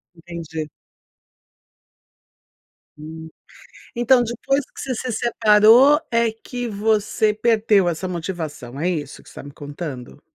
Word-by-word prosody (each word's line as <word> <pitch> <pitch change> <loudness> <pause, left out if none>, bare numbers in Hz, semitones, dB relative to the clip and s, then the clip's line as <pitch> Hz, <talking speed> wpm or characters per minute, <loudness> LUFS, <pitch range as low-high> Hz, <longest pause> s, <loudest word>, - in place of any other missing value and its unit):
Entendi. 160 -2 -7 2.3
Hum, 160 +1 -9 0.7
então 240 +1 +3
depois 270 +4 -1
que - - -13
você 260 -2 -3
se 245 +1 -4
separou 230 +5 +5
é 230 -1 +2
que 245 +2 -6
você 210 0 +1
perdeu 215 -4 +2
essa 175 +2 -3
motivação. 160 -7 -6
É 175 - 0
isso 150 -6 -4
que - - -19
você - - -16
tá - - -9
me 140 0 -11
contando? 145 -3 -8
205 Hz, 120 wpm, -21 LUFS, 160-235 Hz, 2.3 s, separou